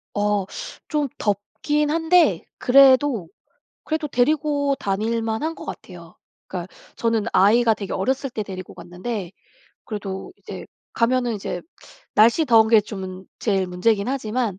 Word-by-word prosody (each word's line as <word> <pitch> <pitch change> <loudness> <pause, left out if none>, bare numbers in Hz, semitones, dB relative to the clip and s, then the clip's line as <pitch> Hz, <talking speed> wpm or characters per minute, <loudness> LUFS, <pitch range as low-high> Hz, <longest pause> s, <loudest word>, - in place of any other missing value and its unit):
어. 205 -1 +1 0.4
좀 295 -2 0
덥긴 290 +9 -1
한데 330 +2 +3 0.2
그래도, 260 - +5 0.5
그래도 315 -1 -2
데리고 285 +1 +1
다닐 220 +4 -1
만한 225 +9 -2
것 - - -10
같아요. 175 -2 -10 0.3
그러니까 180 0 -6 0.2
저는 230 -2 0
아이가 225 +5 +5
되게 200 -3 -6
어렸을 265 +7 -1
때 220 -3 -4
데리고 185 -2 -8
갔는데 180 +1 -6 0.5
그래도 200 - -6
이제 - - -8 0.3
가면은 240 0 +1
이제 195 -3 -4 0.5
날씨 230 +9 +5
더운 225 -4 +5
게 225 -1 +6
좀 190 -2 -7
제일 195 -4 0
문제긴 200 +4 +1
하지만 230 -6 -2
225 Hz, 280 characters per minute, -22 LUFS, 195-270 Hz, 0.5 s, 게